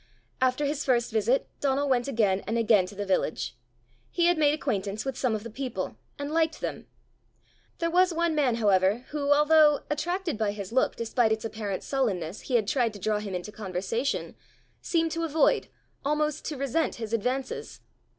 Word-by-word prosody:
After 260 +3 +2
his 290 +1 -1
first 240 -3 +1
visit 225 +4 +1
Donal 280 0 +1
went 250 -2 +1
again 215 -7 +2
and 225 +2 0
again 215 -5 +4
to 205 - -11
the 205 +1 -3
village: 155 -10 -1 0.5
he 345 - +1
had 350 0 +5
made 295 -1 +5
acquaintance 210 -7 -2
with 270 -2 -2
some 255 -4 0
of 210 - -5
the 230 - -8
people, 260 +2 -4 0.2
and 285 +1 -4
liked 320 0 +1
them. - - -5 0.9
There 335 -1 -1
was 365 +1 +4
one 335 0 +1
man, 275 -6 +2
however, 205 +1 +2
who, 290 -1 -1
although, 300 0 +5
attracted 345 - -2
by 210 -2 +1
his 200 -2 -7
look 260 +2 +2
despite 230 0 +1
its 220 +1 -1
apparent 210 -4 -4
sullenness, 200 - -1
he 255 - -2
had 220 -4 +2
tried 235 -3 +1
to 205 - -9
draw 210 +2 0
him 200 -3 -5
into 180 +4 -5
conversation, 210 +6 -3 0.5
seemed 330 -2 0
to 330 0 -2
avoid, 320 -1 +2 0.4
almost 300 +1 0
to 300 - -3
resent 275 +4 0
his 225 -1 -6
advances. 255 +4 -2
250 Hz, 180 wpm, -27 LUFS, 210-295 Hz, 0.9 s, had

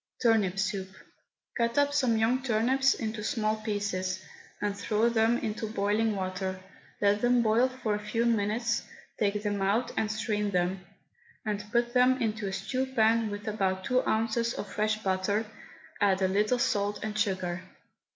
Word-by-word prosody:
TURNIP 215 -6 +2
SOUP. 195 -1 -1 0.7
Cut 235 0 0
up 285 0 +3
some 255 -6 +2
young 235 +4 +2
turnips 260 +3 +2
into 220 -2 -4
small 215 -1 0
pieces, 200 -4 -2 0.5
throw 215 +3 +1
them 230 0 +3
into 220 0 -3
boiling 210 +1 +1
water, 185 0 -3 0.4
let 205 0 +3
them 245 0 +3
boil 230 +4 +3
for 255 -4 -2
a 205 - -1
few 230 +2 0
minutes, 230 +1 +1 0.4
take 210 0 0
them 205 -1 -1
out 220 +6 +1
and 215 -1 0
strain 215 -1 -1
them, 180 0 0 0.6
and 210 -1 -3
put 240 +1 +1
them 255 +1 +4
into 215 -3 -1
a - - -3
stew 255 +7 -2
pan 225 -3 +2
with 205 +1 -6
about 190 -3 -1
two 255 +5 +2
ounces 230 +1 +1
of - - -5
fresh 215 +1 0
butter; 195 +3 0 0.6
add 195 -2 +3
a - - +4
little 210 +6 +2
salt 205 -5 0
and 215 0 -3
sugar. 185 -4 -1
215 Hz, 160 wpm, -29 LUFS, 200-235 Hz, 0.7 s, them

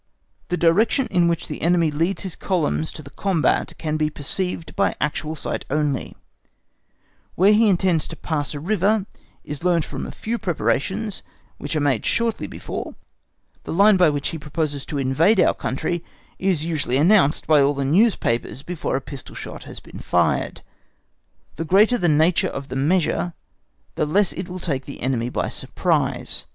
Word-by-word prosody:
The 180 - 0
direction 205 - +3
in 175 -1 +3
which 170 -1 -1
the - - -6
enemy 170 -2 +3
leads 165 +8 -1
his 185 -4 -5
columns 160 -4 -1
to 155 - -9
the 140 - -12
combat 185 -3 0
can 155 -1 -2
be 155 0 +1
perceived 165 +4 -3
by - - +1
actual 155 +1 -2
sight 150 - -4
only; 145 -2 -1 1.2
where 195 +4 +5
he 220 0 +5
intends 180 -4 +2
to - - -7
pass 150 -3 -3
a - - -4
river 200 +4 +1 0.4
is 150 +2 -7
learnt 175 -3 +2
from - - -5
a - - -7
few 230 +2 -4
preparations 195 +2 -1 0.4
which - - -4
are - - +2
made 135 -6 +1
shortly 230 -2 0
before; - - -6 0.7
the - - -6
line 200 +4 +6
by 180 -3 +5
which 145 -1 -1
he 165 - -5
proposes 150 -1 -3
to 145 - -3
invade 145 +10 +3
our - - +5
country 170 +6 -3 0.4
is 185 -5 0
usually 145 -6 0
announced 160 -1 +4
by 155 -2 +5
all 140 +1 +3
the 140 0 -1
newspapers 140 - +1
before 175 -5 -3
a 135 - -1
pistol 135 -1 -9
shot - - -8
has - - -9
been - - -12
fired. - - 0 0.9
The 165 - -2
greater 210 +9 +4
the 175 -3 +2
nature 160 +3 +3
of 140 +1 -7
the - - -5
measure 170 +4 +1 0.6
the 150 - -1
less 195 +5 +2
it 185 0 -6
will 180 - -5
take 140 -6 -3
the 140 - -9
enemy 125 -2 0
by - - -2
surprise. - - -1
165 Hz, 175 wpm, -22 LUFS, 145-185 Hz, 1.2 s, line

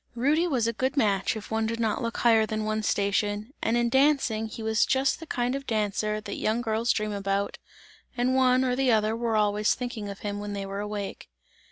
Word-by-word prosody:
Rudy 295 +8 +2
was 255 -8 +1
a 230 - 0
good 260 +4 -2
match 200 -7 +2
if 220 0 -8
one 220 0 0
did 230 +1 -3
not 225 +1 0
look 230 -1 -3
higher 225 -2 +4
than 215 0 -2
one's 215 -1 -1
station, 205 +3 0
and 230 +1 +1
in 240 0 +2
dancing 265 -4 +2
he 225 +1 -8
was 220 0 +2
just 270 +1 +1
the 325 - -9
kind 245 -2 -1
of 275 0 -5
dancer 215 -1 0
that 215 - -6
young 220 +2 0
girls 225 +1 +1
dream 215 -1 -1
about, 200 0 -2 0.6
and 250 +2 +1
one 255 0 +4
or 250 -1 +1
the 265 -1 +2
other 215 0 +2
were 230 -1 -1
always 210 0 +2
thinking 240 -5 -5
of 200 0 -8
him 205 -1 -3
when 205 0 -5
they 200 -1 -4
were 195 +1 -5
awake. 205 -1 -5
220 Hz, 220 wpm, -27 LUFS, 210-245 Hz, 0.6 s, higher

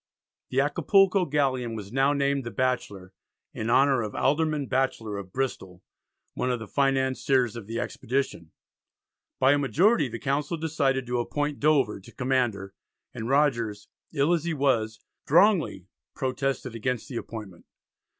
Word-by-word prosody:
The 130 - 0
Acapulco 190 +6 +3
galleon 130 -6 0
was 105 0 -8
now 135 +2 +3
named 140 -1 0
the 120 - -5
Batchelor 100 -5 -2 0.4
in 110 - -4
honour 135 +1 +4
of 105 -2 -5
Alderman 150 0 +1
Batchelor 130 -6 -1
of 95 -2 -10
Bristol, 95 -8 -4 0.5
one 130 - -2
of 125 - 0
the 110 -2 -8
financiers 130 -2 +1
of 115 -4 -8
the 115 +1 -3
expedition. 125 -10 -3 0.9
By 130 +1 +5
a 145 - +3
majority 160 - +3
the 120 - -5
Council 145 +5 -1
decided 145 -5 0
to 125 0 -1
appoint 145 +4 -2
Dover 140 -9 +2
to 95 - -15
command 125 -4 +1
her, 95 -1 -9 0.4
and 110 +2 -5
Rogers, 120 -7 +1 0.2
ill 150 +2 +2
as 165 -3 0
he 170 -1 -2
was, 115 -6 +1 0.3
strongly 170 - +3 0.3
protested 130 -1 -2
against 120 0 -3
the 125 - -5
appointment. 105 -7 -8
130 Hz, 150 wpm, -26 LUFS, 115-145 Hz, 0.9 s, By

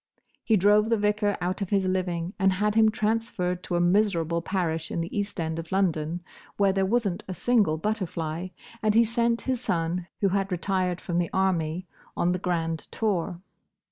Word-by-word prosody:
He 220 - +3
drove 210 +3 +4
the 230 - +3
vicar 210 0 +1
out 180 +3 -2
of 195 - -2
his 195 -2 +2
living, 180 -1 -1
and 190 -1 +4
had 210 +2 +1
him 220 0 +5
transferred 210 -5 -1
to 175 - -3
a - - +2
miserable 175 -3 +2
parish 165 -3 -2
in - - -3
the 165 +1 -4
East 205 -2 -2
end 160 0 -2
of 165 0 -8
London, 175 -3 0 0.4
where 200 -1 +3
there 195 0 +1
was 230 +1 +2
n't 175 -2 -4
a 185 - -5
single 205 -6 +2
butterfly; 170 -4 -2 0.3
and 215 -1 +2
he 230 - +7
sent 235 +1 +1
his 255 -2 -1
son, 170 -3 -1
who 200 - +3
had 195 +1 0
retired 180 0 0
from 175 -1 -2
the 170 - 0
army, 180 -2 0 0.3
on 175 - +2
the 180 - -1
Grand 165 -3 -1
Tour. 185 -5 -1
185 Hz, 190 wpm, -26 LUFS, 170-210 Hz, 0.4 s, he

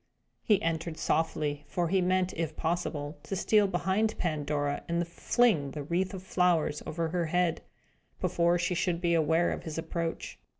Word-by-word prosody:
He 210 -3 +3
entered 165 0 -2
softly, 150 -2 0
for 175 +1 -1
he 190 +1 +3
meant, 185 0 +1
if 160 -2 -3
possible, 160 -3 -2
to 195 - -4
steal 210 +2 +3
behind 190 +4 0
Pandora, 145 -3 -1
and 170 0 0
fling 175 - +2
the 150 - -4
wreath 180 +6 -1
of 185 - -8
flowers 180 -5 +1
over 165 0 -2
her 170 0 -1
head, 175 0 +1 0.6
before 170 0 +2
she 175 +1 0
should 175 -1 0
be 170 -1 +1
aware 165 +1 +3
of - - -3
his 160 -1 -6
approach. 165 0 -4
170 Hz, 165 wpm, -29 LUFS, 160-180 Hz, 0.6 s, He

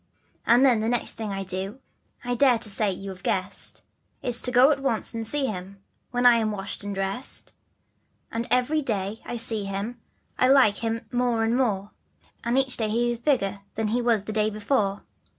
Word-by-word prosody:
And 240 +3 +6
than 245 -4 +4
the 220 +1 0
next 245 -1 -1
thing 220 -2 -5
that 195 - -3
I 195 - -3
do 190 +5 -5 0.4
I 245 0 -1
dare 245 -1 +4
say 210 -1 0
you 195 +1 -6
have 185 -1 -11
guessed; 185 +1 -1 0.4
It's 245 -1 +4
to 250 - 0
go 255 +4 +6
at 285 - 0
once 270 -5 0
and 225 -1 -3
see 285 +3 0
him, 195 -3 -6 0.3
when 245 -1 -1
I 240 -1 +8
am 220 -1 0
washed 200 -1 -5
and 205 -1 -4
dressed. 195 +7 -1 0.8
And 230 +1 -3
every 270 +5 +2
day 210 -4 -2
T 240 - -3
see 220 -2 0
him 200 +5 -4 0.4
I 255 - +5
like 260 -7 +5
him 230 0 -3
more 245 -2 +1
and 225 +1 +1
more, 210 -6 0 0.5
And 235 +2 0
each 265 -1 +2
day 220 -2 -1
he 240 +2 +1
is 235 - -4
bigger 235 -8 0 0.2
than 220 -1 -1
he 240 +3 +1
was 230 -4 +2
the 215 - -5
day 215 0 +2
before. 210 -1 -1
225 Hz, 205 wpm, -25 LUFS, 205-245 Hz, 0.8 s, I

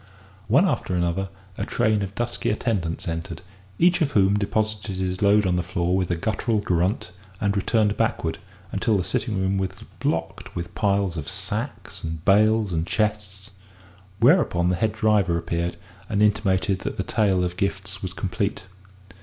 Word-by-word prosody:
One - - +5
after 90 - -1
another, 90 +2 0 0.3
a - - 0
train 110 -1 +1
of 100 0 -4
dusky 120 0 -2
attendants 100 -8 -1
entered, 85 +1 -4 0.3
each 175 0 +4
of 145 -3 +1
whom 100 -1 +4
deposited 105 0 -1
his 95 0 -2
load 105 0 +5
on 90 -1 +2
the - - +1
floor 90 0 -1
with 95 -2 0
a 90 - +1
guttural 110 +5 0
grunt 90 0 0 0.3
and 100 -1 +1
returned 105 +1 +2
backward, - - 0 0.3
until 110 -3 +1
the 90 - 0
sitting 115 -2 -1
room 95 +1 +1
was 95 -1 0 0.3
blocked - - -2
with 85 0 -5
piles 100 -4 +1
of 75 - -4
sacks, - - -5
and 80 -1 -5
bales, 105 0 +4
and 80 +1 -1
chests, 105 -1 -2 0.7
whereupon 115 - +4
the 90 - +2
head 110 +4 +1
driver 100 -6 +2
appeared 85 +1 -2 0.3
and 105 +1 +2
intimated 100 -2 +2
that - - -4
the - - 0
tale 95 -4 +2
of 90 0 -2
gifts 95 -1 -3
was 95 - -4
complete. 100 0 -2
95 Hz, 165 wpm, -24 LUFS, 90-105 Hz, 0.7 s, One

